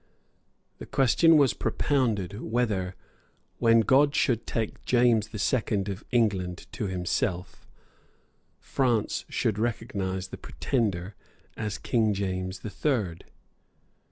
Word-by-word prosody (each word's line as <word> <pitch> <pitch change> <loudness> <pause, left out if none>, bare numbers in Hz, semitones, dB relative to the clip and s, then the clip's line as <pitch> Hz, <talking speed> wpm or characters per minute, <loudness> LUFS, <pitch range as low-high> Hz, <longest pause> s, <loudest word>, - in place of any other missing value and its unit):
The - - -8
question 160 +5 +4
was 140 -4 +4
propounded, 110 -7 -1
whether, 105 -6 -1 0.6
when 115 -1 +5
God 140 +5 +4
should 120 -7 +1
take 110 -2 -3
James 120 -4 +3
the 110 - -8
Second 105 -3 0
of 100 +1 -5
England 100 -7 0
to 105 - -3
himself, 90 +1 -2 0.9
France 115 -6 0
should 110 -4 -1
recognise 100 -5 -2
the - - -8
Pretender 100 -6 -2 0.4
as 105 -2 -3
King 110 -4 +1
James 95 -1 -3
the 110 - -6
Third? 105 - -1
110 Hz, 110 wpm, -27 LUFS, 95-120 Hz, 0.9 s, when